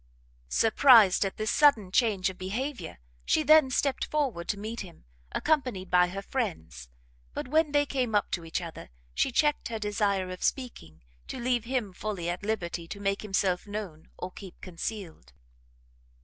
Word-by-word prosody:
Surprised 225 - +6
at 195 - -4
this 215 -1 -1
sudden 235 -11 +4
change 205 -4 +2
of 185 - -16
behaviour, 240 - -4 0.3
she 310 - +2
then 310 -3 +6
stept 270 +1 0
forward 265 - -1
to 205 - -1
meet 220 +3 -5
him, 175 - -10 0.3
accompanied 250 - 0
by 180 0 +5
her 195 +2 -6
friends: 80 - -4 0.5
but - - -4
when 310 +2 +2
they 290 0 +3
came 255 -6 -1
up 205 - +1
to 175 - -2
each 165 +2 -3
other, 165 - -8 0.2
she 265 - +1
checked 295 +4 +1
her 230 - -4
desire 205 -3 -1
of 185 - -8
speaking, 80 - -3 0.2
to - - -6
leave 240 -2 0
him 240 -6 -2
fully 190 -3 -4
at 175 - -5
liberty 180 -5 -3
to 200 - -7
make 195 0 -1
himself 195 -2 0
known, 200 -7 -7
or 180 - -6
keep 190 -1 -11
concealed. 175 - -7
205 Hz, 165 wpm, -28 LUFS, 180-250 Hz, 0.5 s, Surprised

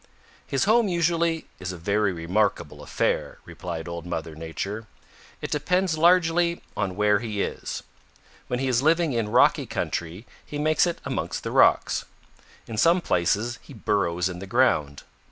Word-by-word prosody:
"His 135 - 0
home 225 +1 +4
usually 170 -2 +1
is 95 0 -4
a 90 - -7
very 100 +4 +1
remarkable 95 +5 -1
affair," - - -1
replied 85 -1 -6
Old 85 -1 -5
Mother 80 -2 -4
Nature. 95 +8 -5 0.6
"It - - -4
depends 180 +4 +1
largely 170 +1 +3
on 95 -1 -2
where 105 0 +3
he 105 -3 -2
is. - - -5 0.6
When 125 - -1
he 135 +1 -1
is 125 -1 +2
living 160 0 +3
in 115 -3 -1
rocky - - +4
country, 85 +6 -4 0.2
he 145 - -7
makes 155 +3 +3
it 170 - -2
amongst - - -3
the - - -4
rocks. - - +3 0.6
In 110 - -7
some 170 +10 +4
places 110 - 0
he 140 - -13
burrows 90 -5 0
in 90 -1 -6
the 95 - -8
ground. 95 - +1
110 Hz, 155 wpm, -25 LUFS, -, 0.6 s, home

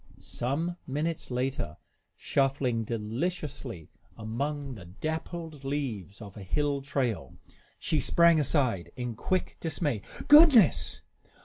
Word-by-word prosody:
Some 160 +8 -2
minutes 150 +4 -2
later, 125 - -2 0.4
shuffling 135 -4 +1
deliciously 115 - -4 0.3
among 140 +6 -3
the 100 -7 -10
dappled 155 - -5
leaves 120 - -4
of 100 -2 -11
a 105 - -9
hill 140 +9 0
trail, 135 -5 -2 0.4
she 155 - 0
sprang 170 +3 +5
aside 130 - +1
in 125 -1 -3
quick 185 - -2
dismay. 145 - -1 0.3
"Goodness!" 295 - +7
135 Hz, 105 wpm, -29 LUFS, 115-155 Hz, 0.4 s, Goodness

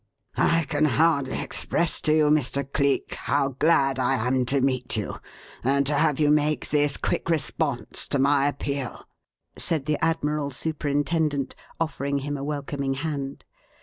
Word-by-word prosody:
"I 165 0 +3
can 150 +1 +1
hardly 140 0 +2
express 170 - -1
to 155 - +3
you, 155 -1 +4
Mr. 140 -2 +1
Cleek, 140 -2 +1
how 140 -1 0
glad 135 -1 +2
I 130 +1 +2
am 125 0 +1
to 140 +2 +3
meet 130 -3 0
you 105 - -3 0.5
and 140 +2 +2
to 145 - +1
have 150 -1 +2
you 150 -1 +4
make 150 0 +1
this 145 -1 +2
quick - - -2
response 150 -6 -1
to 140 - 0
my 140 +1 +3
appeal," 140 -2 -4 0.5
said 155 -5 0
the 150 -1 -1
Admiral 150 -3 0
Superintendent, 145 0 -1 0.3
offering 140 -3 -1
him 145 +1 -3
a 135 - -5
welcoming 140 -2 -3
hand. 140 -2 -4
145 Hz, 150 wpm, -25 LUFS, 135-150 Hz, 0.5 s, you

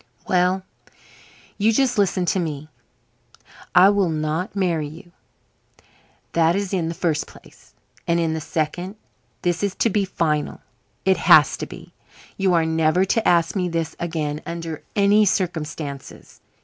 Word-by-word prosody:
"Well, 185 +1 +2 1.0
you 215 +2 +4
just 245 -1 +1
listen 185 -2 +1
to 185 - +1
me. 155 -3 -4 1.1
I 185 +2 +8
will 200 -3 +2
not 155 +4 -2
marry 170 -6 0
you. 170 +4 -13 1.2
That 165 +1 +3
is 200 -1 -2
in 175 -4 0
the 165 - -4
first 165 -4 -1
place. - - -18 0.3
And 170 0 +2
in 165 -1 0
the 160 - -3
second, 170 +6 -3 0.5
this 175 -1 0
is 200 -2 -1
to 230 - +1
be 205 +1 +1
final. 155 -5 -1 0.4
It 190 -1 +4
has - - +6
to - - -5
be. - - -12 0.4
You 190 -2 +2
are 165 -1 +3
never 160 +3 +2
to 220 +3 0
ask 170 0 +3
me 180 -2 0
this 165 -1 -3
again 155 -3 -3
under 165 -2 -6
any 205 +1 +4
circumstances. 160 -7 -3
170 Hz, 150 wpm, -22 LUFS, 160-190 Hz, 1.2 s, I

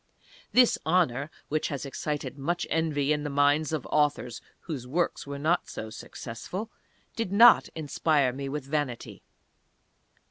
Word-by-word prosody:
This 250 -1 +5
honour 155 -5 +1 0.2
(which 155 +1 -1
has 140 -2 -4
excited 145 +2 -4
much 170 +5 -2
envy 150 -3 +1
in 150 - -1
the 145 - -3
minds 145 +2 +2
of 155 -5 -2
authors 145 -6 +1 0.2
whose 140 -7 -6
works 165 +2 -1
were 140 0 -5
not 160 +5 0
so 110 0 -6
successful), 175 - -7 0.4
did 225 -5 -2
not 230 +4 +7
inspire 150 -3 +1
me 135 +1 -5
with 145 -1 -4
vanity. 140 -4 -3
150 Hz, 140 wpm, -28 LUFS, 140-160 Hz, 0.4 s, not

